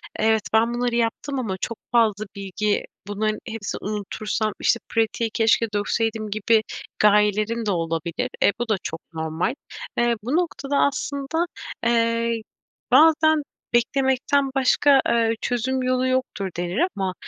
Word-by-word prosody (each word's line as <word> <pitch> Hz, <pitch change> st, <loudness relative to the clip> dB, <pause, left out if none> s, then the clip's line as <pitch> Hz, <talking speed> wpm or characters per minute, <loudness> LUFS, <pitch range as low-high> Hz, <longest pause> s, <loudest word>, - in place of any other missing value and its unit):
evet, 220 Hz, 0 st, +2 dB
ben 230 Hz, +2 st, +3 dB
bunları 240 Hz, 0 st, -1 dB
yaptım 240 Hz, +4 st, -1 dB
ama 205 Hz, -7 st, -3 dB
çok 230 Hz, -, -3 dB
fazla 215 Hz, -3 st, +2 dB
bilgi 200 Hz, +1 st, -1 dB, 0.2 s
bunların 215 Hz, +1 st, -1 dB
hepsini 220 Hz, -3 st, -5 dB
unutursam, 215 Hz, +1 st, -2 dB
işte 235 Hz, -, +2 dB
pratiği 225 Hz, 0 st, 0 dB
keşke 230 Hz, 0 st, +3 dB
dökseydim 215 Hz, +1 st, -1 dB
gibi 215 Hz, +2 st, +2 dB, 0.4 s
gayelerim 210 Hz, +2 st, +3 dB
de 205 Hz, -, +1 dB
olabilir. 165 Hz, +7 st, -2 dB
E, -, -, +6 dB
bu 240 Hz, -1 st, -3 dB
da 215 Hz, -, +3 dB
çok 160 Hz, +2 st, -5 dB
normal. 160 Hz, +9 st, -2 dB, 0.4 s
Eee, 240 Hz, 0 st, +3 dB
bu 255 Hz, +6 st, -1 dB
noktada 290 Hz, -5 st, -1 dB
aslında, 280 Hz, +4 st, 0 dB, 0.4 s
eee, 230 Hz, 0 st, +1 dB, 0.5 s
bazen 315 Hz, -1 st, +5 dB, 0.3 s
beklemekten 265 Hz, +3 st, +2 dB
başka, 270 Hz, +1 st, +4 dB
eee, 230 Hz, -1 st, +2 dB
çözüm 255 Hz, +2 st, -1 dB
yolu 255 Hz, 0 st, +1 dB
yoktur 255 Hz, -7 st, -1 dB
denir. 175 Hz, +5 st, -2 dB, 0.2 s
Ama, 190 Hz, -2 st, -1 dB
230 Hz, 130 wpm, -23 LUFS, 210-255 Hz, 0.5 s, E